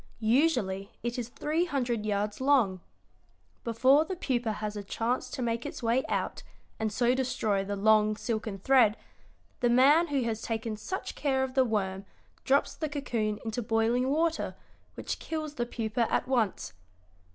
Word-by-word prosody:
"Usually 220 Hz, -5 st, +1 dB
it 240 Hz, +1 st, -2 dB
is 235 Hz, -1 st, -4 dB
three 310 Hz, +7 st, -1 dB
hundred 245 Hz, -9 st, -1 dB
yards 205 Hz, +2 st, -1 dB
long. 245 Hz, -10 st, +3 dB, 0.8 s
Before 255 Hz, +6 st, +4 dB
the 370 Hz, +4 st, -5 dB
pupa 245 Hz, -9 st, -1 dB
has 210 Hz, 0 st, -4 dB
a 205 Hz, -, -5 dB
chance 230 Hz, +5 st, -2 dB
to 255 Hz, -, -4 dB
make 235 Hz, 0 st, -1 dB
its -, -, -7 dB
way 235 Hz, +3 st, +2 dB
out, -, -, -2 dB, 0.4 s
and 220 Hz, -1 st, -1 dB
so 240 Hz, +3 st, +2 dB
destroy 245 Hz, -6 st, 0 dB
the 200 Hz, +1 st, -3 dB
long, 215 Hz, +1 st, +4 dB
silken 220 Hz, -2 st, -3 dB
thread, 230 Hz, 0 st, +4 dB, 0.6 s
the 240 Hz, -, +2 dB
man 280 Hz, +8 st, +5 dB
who 280 Hz, -4 st, 0 dB
has 225 Hz, -1 st, -2 dB
taken 225 Hz, -1 st, -3 dB
such 375 Hz, -, -5 dB
care 265 Hz, -2 st, 0 dB
of 260 Hz, -1 st, -3 dB
the 265 Hz, 0 st, +4 dB
worm 195 Hz, -4 st, -2 dB, 0.4 s
drops 275 Hz, +1 st, +2 dB
the 310 Hz, -, -4 dB
cocoon 230 Hz, -7 st, -2 dB
into 225 Hz, +2 st, -2 dB
boiling 230 Hz, +3 st, +1 dB
water, 325 Hz, +3 st, 0 dB, 0.4 s
which -, -, -4 dB
kills 310 Hz, -2 st, -4 dB
the 240 Hz, -4 st, -2 dB
pupa 225 Hz, 0 st, -1 dB
at -, -, +1 dB
once. 235 Hz, -, 0 dB
235 Hz, 165 wpm, -29 LUFS, 215-265 Hz, 0.8 s, man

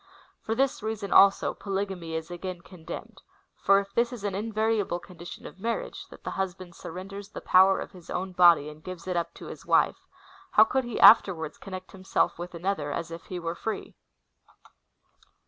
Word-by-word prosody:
For 225 Hz, -, -2 dB
this 270 Hz, +2 st, +1 dB
reason, 215 Hz, -2 st, -3 dB
also, 195 Hz, 0 st, +6 dB
polygamy 195 Hz, -3 st, -4 dB
(7ro\vya/u,ia) 160 Hz, 0 st, -2 dB
is 160 Hz, +2 st, -7 dB
again 175 Hz, 0 st, -6 dB
condemned; 170 Hz, -3 st, -9 dB, 0.3 s
for 195 Hz, 0 st, +4 dB
if 200 Hz, 0 st, -7 dB
this 235 Hz, +1 st, +2 dB
is 240 Hz, -5 st, -8 dB
an 205 Hz, -2 st, -1 dB
invariable 215 Hz, -2 st, 0 dB
condition 175 Hz, -1 st, -11 dB
of 185 Hz, -, -10 dB
marriage, 230 Hz, +3 st, -3 dB
that -, -, -14 dB
the -, -, -4 dB
husband 185 Hz, -2 st, -4 dB
surrenders 195 Hz, +4 st, -8 dB
the -, -, -7 dB
power 190 Hz, +1 st, +5 dB
of -, -, -6 dB
his 180 Hz, -3 st, -15 dB
own 185 Hz, +1 st, -3 dB
body, 175 Hz, -4 st, +6 dB
and 150 Hz, +1 st, -11 dB
gives 185 Hz, -1 st, -8 dB
it 180 Hz, -, -1 dB
up 170 Hz, -1 st, -1 dB
to -, -, -10 dB
his -, -, -9 dB
wife, -, -, +2 dB, 0.5 s
how 215 Hz, -, +8 dB
could 260 Hz, +3 st, 0 dB
he 240 Hz, -, -4 dB
afterwards 170 Hz, -8 st, +6 dB
connect 185 Hz, -1 st, -8 dB
himself 190 Hz, -3 st, 0 dB
with 175 Hz, 0 st, -6 dB
another, 170 Hz, -4 st, -2 dB
as 165 Hz, +3 st, -4 dB
if 165 Hz, 0 st, -8 dB
he 180 Hz, -, -6 dB
were 170 Hz, -1 st, -3 dB
free? 220 Hz, +5 st, -5 dB
185 Hz, 185 wpm, -27 LUFS, 175-205 Hz, 0.5 s, how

